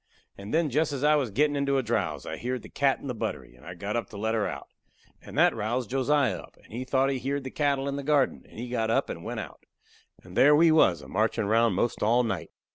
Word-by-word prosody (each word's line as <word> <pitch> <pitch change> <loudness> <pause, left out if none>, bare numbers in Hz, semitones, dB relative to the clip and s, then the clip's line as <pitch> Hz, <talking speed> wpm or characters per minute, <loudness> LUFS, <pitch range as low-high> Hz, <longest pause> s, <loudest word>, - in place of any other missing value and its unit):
And 100 +1 -9
then 160 -2 +1
jest 150 +3 +1
as 140 0 -4
I 150 +1 +5
was 140 -5 +1
gettin' 145 +7 +1
into 140 -1 +1
a 135 - +1
drowse, 90 - -2
I - - -4
heered 125 -1 -4
the - - -11
cat 140 -2 +1
in - - -11
the 130 - -3
buttery, 110 - -5
and 60 - -20
I 90 +3 -8
got 100 +4 -4
up 115 -4 -2
to 105 - -9
let 110 +2 -1
her 110 -2 0
out. - - -6 0.5
And - - -10
that - - +5
roused 115 +2 -2
Josiah 135 0 +1
up, - - -14
and - - -17
he 120 +3 -3
thought 135 +1 +2
he 135 - -2
heered 140 +2 -2
the 130 - -6
cattle 140 -2 0
in 140 0 -2
the 140 - -4
garden, 145 -2 +1
and - - -15
he 120 +2 -5
got 115 -2 -1
up 115 - +1
and - - -7
went - - -4
out. - - -11 0.6
And 90 0 -13
there 145 +2 +6
we 165 +2 +5
was 95 - +4
a - - -11
marchin' 110 +1 0
round 115 0 +3
'most 115 +5 -1
all 120 +4 +3
night. 115 - -3
125 Hz, 270 wpm, -27 LUFS, 110-140 Hz, 0.6 s, there